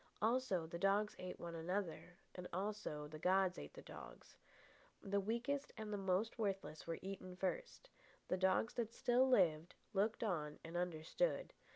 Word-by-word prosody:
Also, 220 -6 +2
the 170 +1 -5
dogs 200 +3 +3
ate 185 0 -5
one 170 -1 -5
another, 175 +1 -2 0.2
and 180 -1 -6
also 190 -6 -2
the 155 +1 -8
gods 185 +1 +3
ate - - -8
the - - -9
dogs. - - -10 0.7
The 200 0 +1
weakest 235 +7 -1
and 215 -1 -4
the - - 0
more 190 +1 +2
worthless 195 -7 -2
were 165 - -1
eaten 185 -1 -5
first. - - -3 0.4
The - - +2
dogs 190 +5 +3
that 230 -1 -2
still 250 +2 +4
lived, 175 -8 +4 0.2
looked 210 +4 +2
on 155 -8 -1
and 165 +1 -7
understood. 180 - 0
190 Hz, 160 wpm, -41 LUFS, 175-215 Hz, 0.7 s, still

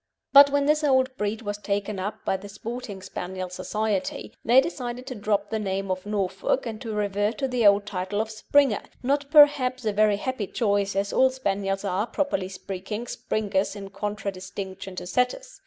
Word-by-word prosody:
But, 280 0 +10
when 285 0 +1
this 300 +1 +2
old 260 -2 +3
breed 210 0 -2
was 205 -1 -4
taken 200 0 -2
up 210 +3 -5
by - - +1
the 195 +2 -7
Sporting 210 -2 -7
Spaniel 185 0 -5
Society, 200 +2 -2
they 245 +3 +6
decided 250 -4 -3
to 265 - -5
drop 205 -2 -1
the 220 - 0
name 195 -1 -2
of 185 +2 -3
"Norfolk," 200 +4 -1
and 225 -1 -5
to 225 -4 -4
revert 205 +1 0
to 270 - 0
the 245 -4 +3
old 200 0 +5
title 200 0 -3
of 220 0 -1
"Springer," 250 +1 +2 0.2
not, 280 +2 0
perhaps, 275 -5 +5
a 215 - +1
very 210 0 +3
happy 235 -2 -3
choice, 200 -3 0
as 200 +1 -1
all 260 - +5
Spaniels 200 -6 -2
are, 195 +3 0
properly 245 -12 -1
speaking, 195 +4 -5
Springers 205 -4 -1
in 195 -1 -8
contradistinction 195 -2 -5
to 180 - -5
Setters. - - -1
210 Hz, 180 wpm, -25 LUFS, 195-250 Hz, 0.2 s, But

